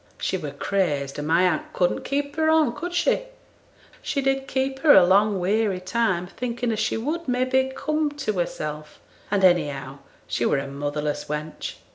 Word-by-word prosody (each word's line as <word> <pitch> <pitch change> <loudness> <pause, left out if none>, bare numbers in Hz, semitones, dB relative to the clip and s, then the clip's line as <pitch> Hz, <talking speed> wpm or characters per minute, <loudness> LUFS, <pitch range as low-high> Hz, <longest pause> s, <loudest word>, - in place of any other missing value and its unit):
'She - - -1
were - - -4
crazed, 145 -9 -1
and 145 - -4
my 165 +3 +4
aunt 180 -4 0
couldn't 180 -1 +1
keep 285 +1 -2
her 315 0 +2
on, 315 -6 +4
could 350 +6 -5
she? 355 +7 +1 0.8
She 285 - -2
did 270 0 0
keep 265 0 -1
her 300 0 +6
a 185 - +8
long 200 +2 +3
weary 200 +1 +1
time, 185 -2 0
thinking 240 +4 -3
as 220 - -2
she 220 0 0
would, 310 +8 -3
may 250 0 +1
be, 265 0 +1
come 305 0 0
to 275 -7 -2
hersel', 150 -3 -3 0.4
and, 200 -1 +1
anyhow, 145 -7 +2 0.3
she - - -2
were - - +2
a 135 - -2
motherless 145 +1 -3
wench. 150 +1 -5
205 Hz, 180 wpm, -24 LUFS, -, 0.8 s, a